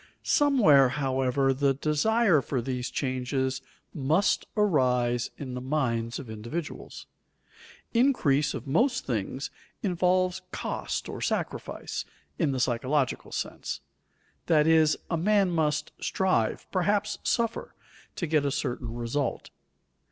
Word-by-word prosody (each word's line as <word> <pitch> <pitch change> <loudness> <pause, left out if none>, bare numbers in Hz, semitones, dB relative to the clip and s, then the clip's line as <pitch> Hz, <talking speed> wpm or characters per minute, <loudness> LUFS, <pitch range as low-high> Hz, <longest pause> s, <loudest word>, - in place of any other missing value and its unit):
Somewhere, 205 - +5
however, 135 0 +1
the 135 0 +1
desire 160 - +3
for 135 0 -2
these 125 0 -3
changes 130 0 -1 0.3
must 155 +7 +1
arise 125 - +2
in 130 -3 -6
the 125 - -4
minds 120 -5 -1
of 135 - -8
individuals. 115 +10 -6 0.9
Increase 230 - +3
of - - -6
most 245 - +1
things 125 +3 -3 0.3
involves 185 -1 +1
"cost" - - -3
or - - -6
sacrifice, - - -3 0.4
in 155 -5 +2
the 130 - -2
psychological 130 +3 0
sense; - - -4 0.7
that 155 -3 +4
is, 160 -1 +4 0.2
man 195 +2 +3
must 155 -2 0
strive, 185 - 0
perhaps 200 +3 0
suffer, 230 -1 -1 0.4
to 175 - -2
get 155 -2 +2
a 140 - +1
certain 125 -4 -3
result. 120 +3 -2
145 Hz, 115 wpm, -28 LUFS, 130-180 Hz, 0.9 s, Somewhere